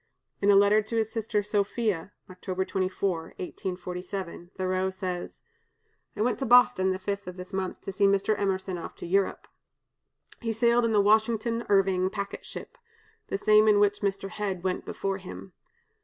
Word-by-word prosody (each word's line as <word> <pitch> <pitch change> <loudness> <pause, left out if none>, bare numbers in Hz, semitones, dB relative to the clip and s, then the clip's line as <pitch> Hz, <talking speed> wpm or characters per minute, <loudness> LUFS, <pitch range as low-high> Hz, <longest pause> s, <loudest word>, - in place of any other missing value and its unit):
In 200 - +3
a 200 - +7
letter 205 +2 +5
to 215 +2 -6
his 220 -1 0
sister 220 -2 -1
Sophia 205 -2 -1 0.2
(October 185 0 -4
24, 185 -2 -1 0.2
1847), 180 -1 -5
Thoreau 185 0 0
says: 185 -2 -5 0.4
"... - - -45
I 210 - +1
went 245 - 0
to 270 - -1
Boston 240 -6 +5
the 185 - 0
5th 200 +1 -4
of 180 0 -7
this 180 +2 -9
month 190 -1 -3
to - - -5
see 200 +1 +3
Mr. 200 +2 +2
Emerson 190 -2 -1
off - - -8
to - - -8
Europe. 195 +3 0 0.9
He 225 -1 -2
sailed 235 +1 +3
in 230 - +1
the 210 -2 +4
'Washington 220 +2 +2
Irving' 190 -2 +3
packet 200 0 -5
ship, - - -9 0.5
the - - -2
same 215 +1 +5
in 210 -1 +5
which 205 0 +2
Mr. 195 -1 -1
Hedge 195 -4 -3
went 185 -1 -2
before 195 -1 -2
him. 185 0 -10
195 Hz, 170 wpm, -27 LUFS, 185-210 Hz, 0.9 s, a